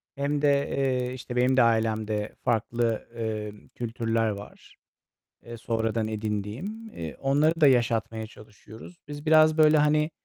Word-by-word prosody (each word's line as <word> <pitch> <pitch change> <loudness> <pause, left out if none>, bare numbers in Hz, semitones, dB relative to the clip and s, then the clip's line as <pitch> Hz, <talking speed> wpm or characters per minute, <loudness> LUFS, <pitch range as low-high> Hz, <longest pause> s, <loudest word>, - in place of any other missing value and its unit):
Hem 140 +1 -1
de, 145 - +4 0.2
eee, 130 -2 -1
işte 125 -1 -7
benim 130 +1 +2
de - - +7
ailemde 110 -2 0
farklı, 115 0 -1
emm, 110 -2 -5
kültürler 115 -1 -2
var, 100 0 -9 0.7
eee, 120 0 -9
sonradan 115 -1 -2
edindiğim, 110 - -4
eee, 80 -2 -6
onları 150 +4 +2
da 150 - +7
yaşatmaya 115 -3 +1
çalışıyoruz. 110 - -14
Biz 145 +1 -8
biraz, 155 0 +5
böyle, 155 0 +6
hani, 150 +1 +2
115 Hz, 135 wpm, -26 LUFS, 110-145 Hz, 0.7 s, de